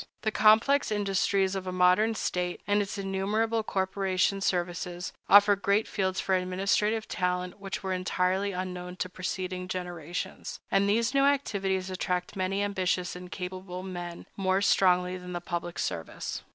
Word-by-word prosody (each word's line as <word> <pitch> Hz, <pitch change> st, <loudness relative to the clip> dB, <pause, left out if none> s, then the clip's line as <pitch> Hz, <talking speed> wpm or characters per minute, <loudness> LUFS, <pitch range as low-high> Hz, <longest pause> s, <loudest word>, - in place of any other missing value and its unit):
The 220 Hz, -, +1 dB
complex 225 Hz, +6 st, +4 dB
industries 195 Hz, -1 st, +1 dB
of 190 Hz, -1 st, -4 dB
a -, -, -1 dB
modern 185 Hz, +5 st, +4 dB
state, 180 Hz, -3 st, -2 dB
and 205 Hz, 0 st, +2 dB
its 200 Hz, +1 st, -4 dB
innumerable 205 Hz, +4 st, 0 dB
corporation 190 Hz, -1 st, 0 dB
services, 175 Hz, -1 st, -2 dB, 0.2 s
offer 205 Hz, 0 st, +8 dB
great 200 Hz, +2 st, +1 dB
fields 190 Hz, -2 st, -1 dB
for 190 Hz, -, 0 dB
administrative 195 Hz, +4 st, +1 dB
talent 180 Hz, 0 st, -2 dB
which 195 Hz, -1 st, -5 dB
were 190 Hz, -1 st, -1 dB
entirely 185 Hz, +2 st, 0 dB
unknown 180 Hz, -1 st, -5 dB
to 185 Hz, -, -3 dB
preceding 185 Hz, 0 st, -4 dB
generations; 175 Hz, -2 st, -5 dB
and 200 Hz, +1 st, +3 dB
these 230 Hz, +4 st, +2 dB
new 275 Hz, 0 st, +4 dB
activities 195 Hz, -9 st, 0 dB
attract 180 Hz, 0 st, -2 dB
many 195 Hz, +1 st, 0 dB
ambitious 185 Hz, -3 st, -1 dB
and 180 Hz, 0 st, -9 dB
capable 185 Hz, 0 st, -6 dB
men 175 Hz, -2 st, -6 dB
more 190 Hz, -1 st, +1 dB
strongly 180 Hz, -2 st, +3 dB
than 180 Hz, 0 st, -8 dB
the 175 Hz, -, -2 dB
public 175 Hz, 0 st, -4 dB
service. 80 Hz, -, -4 dB
190 Hz, 150 wpm, -28 LUFS, 180-200 Hz, 0.2 s, offer